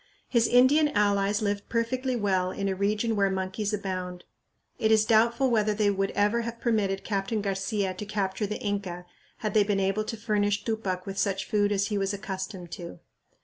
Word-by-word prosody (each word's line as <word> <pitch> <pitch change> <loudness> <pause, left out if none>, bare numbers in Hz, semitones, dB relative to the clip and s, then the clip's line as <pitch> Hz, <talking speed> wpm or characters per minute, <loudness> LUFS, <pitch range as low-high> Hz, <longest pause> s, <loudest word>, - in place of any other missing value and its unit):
His 235 -2 +3
Indian 265 +5 +5
allies 205 0 +2
lived 205 0 -2
perfectly 250 +3 -1
well 190 -5 +1
in 195 +1 -3
a 195 - +1
region 210 +4 0
where 200 -1 +2
monkeys 190 +2 -2
abound. 185 -3 -4 0.6
It 220 - +2
is 220 -1 +5
doubtful 235 +4 +3
whether 215 -2 +2
they 205 -1 +2
would 195 0 0
ever 210 +3 +2
have 230 0 -5
permitted 205 -5 0
Captain 200 +1 -1
Garcia 195 0 -1
to 195 +3 -7
capture 205 0 -1
the 210 - -3
Inca 190 -4 -3 0.4
had 210 - 0
they 215 - +5
been 200 -1 0
able 195 +2 +1
to 225 - -4
furnish 210 -2 0
Tupac 195 -5 -2
with 195 -1 -4
such 195 -1 0
food 205 -1 +1
as 200 +1 +1
he 205 -2 0
was 195 +1 -1
accustomed 190 -3 -6
to. 170 -1 -7
205 Hz, 190 wpm, -27 LUFS, 195-220 Hz, 0.6 s, Indian